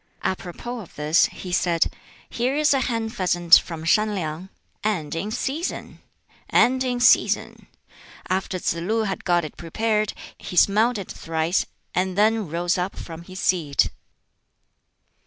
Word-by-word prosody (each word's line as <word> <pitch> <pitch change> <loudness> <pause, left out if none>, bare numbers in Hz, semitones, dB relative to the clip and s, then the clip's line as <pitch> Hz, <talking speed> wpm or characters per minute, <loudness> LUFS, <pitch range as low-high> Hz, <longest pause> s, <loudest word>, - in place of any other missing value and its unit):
Apropos 195 +6 -4
of 195 - -12
this, 150 +3 +3
he 180 - -9
said, 170 -2 +2 0.4
"Here 250 +3 -1
is 300 -1 +3
a 270 - +2
hen 230 -3 -1
pheasant 175 -6 +5
from 165 -2 -7
Shan 210 +5 +2
Liang 165 +1 -4 0.3
and 180 -9 -1
in 180 +6 -3
season! 280 - -4 0.5
and 260 +1 +4
in 250 -1 -1
season!" 245 - +3 0.6
After 185 0 -1
Tsz 180 - 0
lu 220 +5 0
had 195 -3 -3
got 175 -2 +2
it 150 - -9
prepared, 215 +5 -1 0.3
he - - -7
smelt 215 +6 +4
it 195 - -6
thrice, 165 +2 -1 0.3
and 185 +1 -1
then 215 -3 +2
rose 175 +3 0
up 180 +2 -2
from 165 -1 -8
his 185 +2 -10
seat. 160 -8 +1
190 Hz, 145 wpm, -23 LUFS, 170-225 Hz, 0.6 s, pheasant